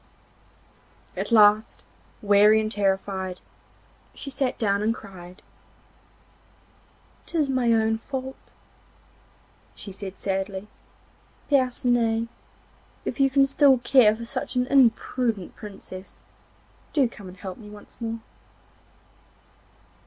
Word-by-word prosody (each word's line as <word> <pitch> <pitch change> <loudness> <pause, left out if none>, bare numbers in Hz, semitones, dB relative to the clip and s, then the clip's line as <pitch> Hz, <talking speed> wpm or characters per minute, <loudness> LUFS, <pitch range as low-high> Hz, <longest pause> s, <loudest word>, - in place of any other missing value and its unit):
At - - -4
last, 215 -1 +4 0.4
weary 210 +1 +6
and 215 0 -2
terrified, 190 -2 -1 0.8
she 275 - -5
sat 265 -2 -1
down 200 -2 +1
and 225 +2 +1
cried. 180 -3 -12 1.8
'It - - -10
is 300 -4 +2
my 255 -3 +2
own 225 0 +2
fault,' 265 +2 -7 1.2
she 200 - -9
said 195 0 -7
sadly. 195 +1 -3 0.8
'Percinet, 240 -4 +1 0.8
if - - -4
you 270 0 +4
can 275 +1 +4
still 275 -1 +4
care 240 -3 +5
for 230 +1 -8
such 235 - -5
an 250 0 +2
imprudent 240 -5 +1
Princess, 195 -2 -11 0.7
do 275 -4 +3
come 210 -4 -12
and 185 +1 -11
help 190 -2 -8
me 210 -2 -11
once 210 +3 -15
more. 225 0 -4
220 Hz, 110 wpm, -25 LUFS, 200-250 Hz, 1.8 s, weary